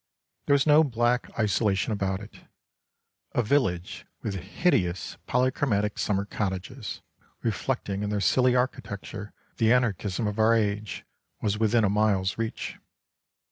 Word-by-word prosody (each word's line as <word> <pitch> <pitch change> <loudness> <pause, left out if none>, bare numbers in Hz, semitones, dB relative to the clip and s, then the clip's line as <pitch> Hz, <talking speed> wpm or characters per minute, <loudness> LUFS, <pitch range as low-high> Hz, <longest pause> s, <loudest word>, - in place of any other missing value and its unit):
There 140 - +5
was 140 - +2
no 155 +1 +7
black 120 -2 +1
isolation 105 -1 +1
about 95 -1 -1
it. 105 - -12 0.9
A 125 - +2
village 105 -8 0 0.2
with 105 - -2
hideous 95 - 0
polychromatic 125 -5 +1
summer 100 -1 0
cottages, 100 +3 -4 0.4
reflecting 100 0 -1
in 105 - -1
their 105 -1 0
silly 125 +7 +3
architecture 105 -4 -3 0.3
the 115 0 +3
anarchism 115 -3 +1
of 105 +1 -2
our 110 +1 +5
age, 105 -1 -1 0.3
was 105 0 -1
within 115 +1 +3
a 100 - +3
mile's 100 -3 +2
reach. 115 -1 -4
105 Hz, 130 wpm, -27 LUFS, 100-120 Hz, 0.9 s, no